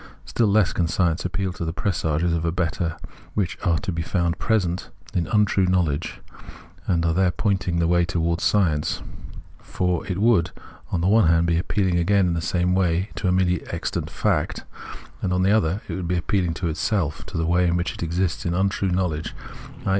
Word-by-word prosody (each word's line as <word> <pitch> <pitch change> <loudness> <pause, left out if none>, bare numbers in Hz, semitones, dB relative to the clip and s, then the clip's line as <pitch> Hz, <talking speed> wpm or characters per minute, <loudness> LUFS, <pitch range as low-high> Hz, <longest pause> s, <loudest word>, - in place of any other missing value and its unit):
Still 115 - +1
less 100 -2 +3
can 85 - +1
science 85 -1 0
appeal 95 0 -2
to 85 - -5
the 80 -1 -2
presages 85 -3 0
of 85 -1 -1
a 85 - 0
better, 85 -1 -2 0.4
which 100 -4 0
are 85 -3 +2
to 95 - -3
be 80 -1 -2
found 85 0 -1
present 95 -6 0 0.2
in 85 - 0
untrue 105 -3 +2
knowledge 85 -5 0 0.7
and 85 -2 +1
are 85 - +2
there 95 +1 +3
pointing 95 -2 0
the 85 -1 +2
way 85 0 +3
towards 85 -1 -1
science; 80 -8 +1 0.6
for 90 -2 -1
it 90 - -2
would, 100 -5 +3 0.4
on 85 - 0
the 90 - +1
one 105 -2 +5
hand, 85 +1 +4
be 85 0 +2
appealing 90 -1 0
again 100 +2 +3
in 85 - +1
the 85 - -1
same 90 +2 +1
way 90 0 +1
to 95 - -3
a - - +3
merely 90 -1 +2
existent - - -3
fact; - - -1 0.6
and, 90 - -1
on 90 0 +1
the 95 - +3
other, 100 -2 +1
it - - -5
would 90 -2 -3
be 90 +1 0
appealing 85 0 0
to 85 - -2
itself, 85 -1 -1
to - - -5
the 80 - 0
way 90 +2 +3
in 85 - +1
which 90 +1 -1
it - - -10
exists 85 +1 -1
in 85 0 -1
untrue 95 +1 +1
knowledge, 90 -4 -1 0.5
i. - - 0
90 Hz, 205 wpm, -23 LUFS, 85-95 Hz, 0.7 s, one